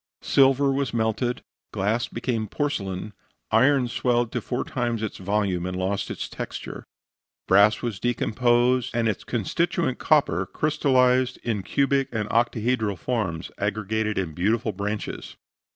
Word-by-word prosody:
Silver 135 0 +4
was 135 -4 -1
melted, 115 +2 -1 0.3
glass 105 +4 0
became 115 -2 -2
porcelain, 105 -7 -3 0.4
iron 130 +3 +4
swelled 120 -1 0
to - - -2
four 125 - -2
times 120 -3 -2
its 110 - -4
volume 95 -2 0
and 90 0 -4
lost 95 +2 -1
its - - -4
texture. - - -7 0.6
Brass 100 +3 +5
was 115 -5 -3
decomposed, 120 +1 +2
and 115 -1 +1
its 105 - -2
constituent 165 - -1
copper 95 - +2
crystallized 130 -4 +2
in 110 -4 -1
cubic 140 +5 +1
and 110 -3 -2
octahedral 115 -3 +1
forms 95 -10 -2
aggregated 105 +1 -1
in 90 -5 -2
beautiful 110 +6 0
branches. 105 +1 -5
115 Hz, 130 wpm, -25 LUFS, 105-125 Hz, 0.6 s, Brass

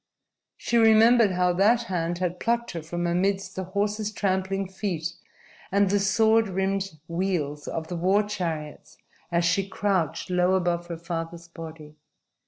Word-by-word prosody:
She 235 - 0
remembered 225 -1 +6
how 180 0 +2
that 215 +6 +3
hand 175 -5 -2
had 180 0 -2
plucked 235 0 0
her 170 - -5
from 175 +2 -4
amidst 190 +2 0
the 190 - -3
horse's 205 +2 -1
trampling 195 -1 -1
feet 180 -4 -3 0.6
and 200 0 +3
the 205 - +3
sword 220 +2 +3
rimmed 195 -2 -2
wheels 170 -5 -2
of 160 -1 -4
the 175 - -4
war 190 +5 +2
chariots 165 -7 -5 0.3
as 170 0 +2
she 195 +3 +1
crouched 190 -5 -1
low 180 +1 +3
above 175 -2 0
her 170 -1 -5
father's 170 0 -5
body. 160 -2 -10
185 Hz, 150 wpm, -26 LUFS, 170-200 Hz, 0.6 s, remembered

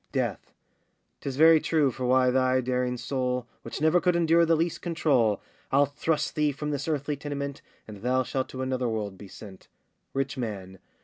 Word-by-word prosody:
DEATH. - - -2 0.7
'Tis 135 -2 -4
very 160 +1 +7
true, 150 -4 +2
for 125 +1 -3
why 130 0 +4
thy 130 0 +2
daring 125 0 -1
soul, 125 0 -2 0.2
Which 115 - -6
never 160 +3 +4
could 180 -1 +2
endure 170 0 +4
the 165 - +4
least 165 +1 -1
control, 140 - +1 0.3
I'll 140 +2 +5
thrust 150 +2 -1
thee 150 -1 +1
from 150 +2 -4
this 145 +1 -3
earthly 150 -1 -1
tenement, 140 -1 -5 0.3
And 105 -2 -9
thou 125 +5 +1
shalt 130 +1 -3
to 130 0 -5
another 130 -2 -1
world 105 -3 -3
be 100 +1 -11
sent. 95 0 -12 0.5
RICH 135 0 -1
MAN. 95 -5 -5
130 Hz, 180 wpm, -27 LUFS, 125-150 Hz, 0.7 s, very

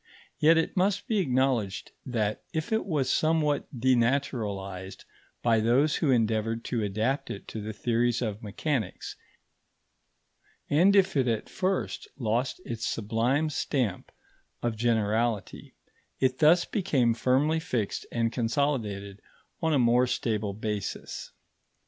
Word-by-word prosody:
Yet 160 +2 +6
it 165 - 0
must 200 +2 +1
be 220 -2 +1
acknowledged 130 - 0 0.2
that 110 -4 -1
if 160 +4 -3
it 220 -2 0
was 145 -7 0
somewhat 155 -2 +1
denaturalised 115 -7 0 0.4
by 115 -2 +4
those 130 +7 +3
who 155 - +1
endeavoured 115 -1 +1
to 120 -3 -1
adapt 110 +7 -1
it 100 - -7
to 110 - -5
the 110 +1 -4
theories 120 +2 0
of 110 -4 -3
mechanics, 110 - -3 1.5
and 180 +7 +4
if 195 -2 +4
it 130 -3 +2
at 115 -2 -1
first 190 0 -2
lost 120 +3 -1
its 115 -1 -5
sublime 120 +8 0
stamp 120 -11 -2 0.5
of 120 -2 0
generality, 110 -2 -1 0.4
it 130 0 +1
thus 165 +3 +5
became 135 - +1
firmly 135 +7 +2
fixed 115 -9 -3
and 115 -1 0
consolidated 115 -6 -1 0.4
on 160 -1 +1
a 150 - +3
more 125 0 +4
stable 110 -4 -1
basis. 105 -2 -4
120 Hz, 125 wpm, -28 LUFS, 110-145 Hz, 1.5 s, Yet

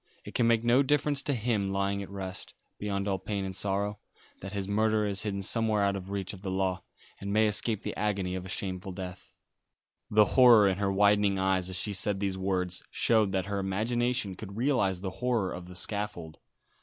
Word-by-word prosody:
It - - -9
can 120 - +2
make 115 -1 +3
no 120 +3 +4
difference 145 0 +1
to 140 0 -1
him 105 -4 -1
lying 100 +1 -1
at 100 - -8
rest, 95 -2 -7 0.2
beyond 100 -1 -2
all 95 -1 0
pain 100 +1 -3
and 95 -1 -5
sorrow, 100 +2 -1 0.4
that 95 - -7
his 100 -1 -3
murderer 110 +1 +1
is 100 -2 0
hidden 100 -2 -3
somewhere 110 0 +1
out 100 0 +1
of 95 -1 -7
reach 100 -1 -3
of 95 - -10
the 100 - -4
law, 95 -1 -1 0.4
and 100 0 -5
may 110 +1 +4
escape 105 0 +1
the 105 - -4
agony 100 -3 -1
of 95 -1 -4
a 95 - -9
shameful 95 0 -4
death." 90 0 -8 0.8
The 105 0 +5
horror 120 -5 +7
in 95 0 0
her 100 -1 +1
widening 100 0 +3
eyes 95 -1 +1
as 95 - -4
she 105 +3 -1
said 95 +1 +2
these 100 -1 -1
words 95 -1 -2
showed 110 -4 +2
that 95 -1 0
her 100 0 -2
imagination 110 +3 0
could 100 +2 -9
realise 115 -8 +1
the 95 -1 -4
horror 120 -7 0
of 90 0 -8
the 90 - -11
scaffold. 90 -5 -1
100 Hz, 205 wpm, -29 LUFS, 95-110 Hz, 0.8 s, horror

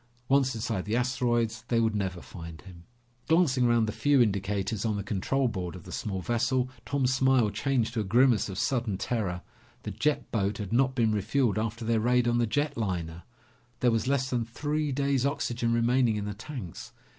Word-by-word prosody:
Once 135 -2 +3
inside 110 -4 -2
the 105 +2 -1
asteroids, 120 -3 0
they 115 - +2
would 110 -1 +2
never 95 -3 -2
find 85 -2 -9
him. 85 -3 -14 0.4
Glancing 150 -7 +3
around 120 -1 +3
the 110 - -2
few 145 +4 +2
indicators 100 -1 0
on 110 -2 0
the 100 - -3
control 115 +6 0
board 95 -6 -4
of 90 - -10
the - - -11
small 95 -3 -3
vessel, 125 +3 0 0.2
Tom's 135 -2 +1
smile 130 -4 +3
changed 115 +1 0
to 120 - -1
a - - 0
grimace 120 +2 +3
of 95 - -6
sudden 120 -6 0
terror. 95 -6 -2 0.4
The - - -4
jet 150 0 -1
boat 100 -2 0
had 105 0 -5
not 130 +2 +2
been 115 -3 +2
refueled 110 +2 +1
after 115 +1 -4
their 115 0 +2
raid 120 +2 +2
on 120 0 +2
the 120 - +2
jet 145 +5 -1
liner. 85 -7 -3 0.6
There 125 - +4
was 115 +1 0
less 135 -1 +1
than 120 -2 +1
three 145 +5 -2
days' 140 -1 +1
oxygen 120 -5 -1
remaining 115 0 +2
in 105 -1 -3
the 105 - -3
tanks. 110 - -8
115 Hz, 195 wpm, -28 LUFS, 105-130 Hz, 0.6 s, There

